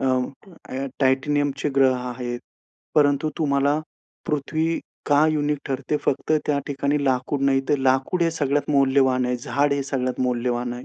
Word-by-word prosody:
अ, - - -2 0.7
अ 135 +1 -2
टायटॅनियमचे 140 +2 +1
ग्रह 130 -1 +4
आहेत. 125 -1 -5 0.5
परंतु 145 +1 +3
तुम्हाला 145 0 +2 0.5
पृथ्वी 155 +2 -1 0.3
का 145 +1 +4
युनिक 150 -1 0
ठरते 140 +2 -1
फक्त 140 - 0
त्या 145 -1 +1
ठिकाणी 140 0 -1
लाकूड 130 +2 0
नाही, 135 -1 +3
तर 145 - +3
लाकूड 135 +7 +1
हे 165 - +2
सगळ्यात 145 -3 -1
मौल्यवान 135 -2 +3
आहे. 125 - 0
झाड 140 +4 0
हे 140 0 0
सगळ्यात 130 -2 -2
मौल्यवान 120 -1 -1
आहे. 125 +1 -8
140 Hz, 150 wpm, -23 LUFS, 130-145 Hz, 0.7 s, ग्रह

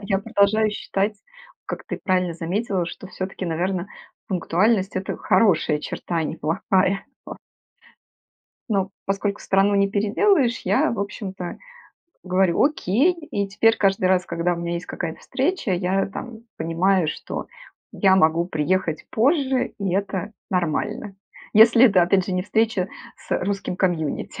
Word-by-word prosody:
я 195 -1 0
продолжаю 210 +2 +2
считать, 205 0 -2 0.5
как - - -6
ты - - -5
правильно 185 -2 +1
заметила, 180 +1 -2
что 185 - -8
всё-таки, 190 0 -6
наверно, 180 +3 -2 0.4
пунктуальность- 190 +2 +1
это 185 - -3
хорошая 165 -8 +2
черта, 170 - -5
а 160 - +1
не - - -4
плохая. 190 +4 0 1.7
Но, 195 -2 0 0.2
поскольку 200 +1 -1
страну 195 +1 +2
не 200 0 +2
переделаешь, 235 - +2
я, 200 +4 +2
в 215 - -3
общем-то, 190 -3 -5 0.6
говорю: 185 -1 +2
"Окей". 285 - +2
И 295 - -4
теперь 225 +3 +3
каждый 195 -2 +2
раз, 185 0 +2
когда 170 +1 -1
у - - -2
меня 170 0 -3
есть 170 - -5
какая-то 165 -2 -5
встреча, 275 - -1
я 185 +2 0
там 225 +3 -8 0.2
понимаю, 165 +1 +1
что - - -5 0.5
я 190 -2 +4
могу 170 -1 +3
приехать 160 0 -1
позже, 265 +1 +1
и 195 -3 -1
это 195 +1 -2 0.2
нормально. 180 +3 -2 0.4
Если 230 +3 +7
это, 195 -7 +5
опять 180 +2 +3
же, 190 - -4
не 180 - 0
встреча 215 -2 0 0.3
с - - -3
русским 195 -2 -3
комьюнити, 170 -6 -1
195 Hz, 140 wpm, -23 LUFS, 180-210 Hz, 1.7 s, Если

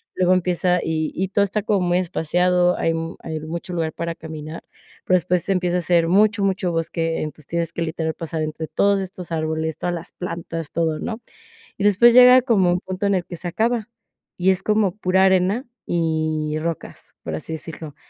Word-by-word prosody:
Luego 185 0 +3
empieza 180 0 +1
y 160 -1 -1
y 190 +1 -1
todo 200 - +1
está 200 +1 -1
como 205 -1 +1
muy 175 0 +2
espaciado, 180 +1 +1
hay 165 - +1
m 165 0 -4
hay 160 -1 -4
mucho 170 +3 -6
lugar 165 -2 -1
para 170 0 -3
caminar, 155 0 -8 0.4
pero 185 - +3
después 180 0 -1
empieza 180 -2 +1
a - - -2
ser 170 -1 +2
mucho, 205 +3 +3
mucho 190 -2 0
bosque, 165 0 -1
entonces 155 -1 -8
tienes 170 0 -2
que 170 - -4
literal 160 0 -2
pasar 165 -1 -4
entre 155 +1 -4
todos 200 +3 +2
estos 185 -2 -8
árboles, 160 -1 -2
todas 175 0 -1
las 170 - -8
plantas, 170 -3 -6
todo, 160 -2 0
¿no?, 225 +6 -5 0.6
y 200 - -3
después 210 +4 +6
llega 250 +1 +8
como 200 -8 +3
un 175 - +1
punto 190 +2 -3
en 200 - +2
el 180 -2 -1
que 175 - -8
se 175 - -5
acaba, 225 +3 0 0.5
y 185 +1 +3
es 185 - -1
como 210 -4 +1
pura 190 -2 +2
arena 190 +6 +2 0.2
y 155 -2 0
rocas, 165 0 -6
por 80 - -5
así 120 - -6
decirlo. 160 -2 -7
175 Hz, 195 wpm, -22 LUFS, 160-190 Hz, 0.6 s, llega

